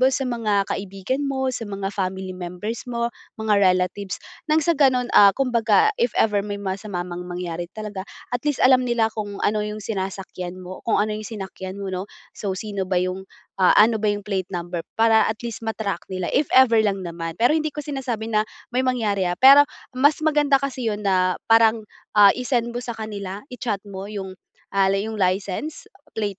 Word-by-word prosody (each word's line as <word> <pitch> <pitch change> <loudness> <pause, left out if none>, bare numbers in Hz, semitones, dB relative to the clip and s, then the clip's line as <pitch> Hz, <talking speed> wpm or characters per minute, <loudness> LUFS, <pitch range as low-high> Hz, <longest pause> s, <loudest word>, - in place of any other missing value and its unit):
mo 260 - +6
sa 270 0 -1
mga 220 -5 0
kaibigan 195 +8 -3
mo, 265 -1 -1
sa 230 -4 -5
mga 195 0 -4
family 190 -1 -3
members 180 +7 -6
mo, 235 -1 -2 0.2
mga 215 -2 +2
relatives, 185 0 +1 0.3
nang 310 0 +3
sa 340 - +4
gano’n, 260 -4 +2
ah, 200 - +8
kumbaga 245 - +3
if 240 - +1
ever 210 -2 +3
may 205 0 -4
masama 195 -2 -4
mang 180 0 -7
mangyari 175 -1 -4
talaga, 210 -2 -6 0.2
at 245 - 0
least 290 - 0
alam 255 0 +6
nila 225 -2 +1
kung 205 -2 -5
ano 210 0 +2
’yong 210 -1 -5
sinasakyan 190 -3 -5
mo 185 0 -9
kung - - +3
ano 210 +1 +1
’yong 215 0 -5
sinakyan 190 -3 -7
mo, 195 -1 -5
‘no? 185 +2 -4 0.2
So, 195 -2 -4
sino 200 -2 -4
ba 185 - 0
’yong 185 +1 -2 0.3
ah, 185 - +5
ano 220 +1 +5
ba 215 - -1
’yong 205 0 0
plate 190 -2 -2
number 175 -1 -4
para 225 -1 +4
at 220 +1 -3
least 235 -3 -5
ma-track 220 -5 -4
nila 185 -2 -3
if 285 +2 +2
ever 255 -3 +6
lang 200 -3 +1
naman. 165 -1 -5
Pero 235 +2 +3
hindi 310 -1 0
ko 295 - -4
sinasabi 250 -6 -4
na 215 0 +2 0.2
may 255 +1 0
mangyari, 210 -7 0
ah, 175 - 0
pero 275 +6 +8 0.2
mas 285 +4 +2
maganda 295 -2 +3
kasi 260 -3 -3
’yon 210 -1 -2
na 185 -2 +2 0.2
parang, 225 0 +5 0.3
ah, 205 -1 +8
i-send 245 -2 0
mo 240 - -4
sa 240 -1 -5
kanila, 205 -2 -6
i-chat 230 -5 -3
mo 195 0 -7
’yong, 190 -3 -7 0.3
ah, 195 -1 +3
li 195 +2 +1
’yong 215 - -6
license 195 +10 -2 0.2
plate 205 -3 -3
210 Hz, 195 wpm, -23 LUFS, 190-235 Hz, 0.3 s, ah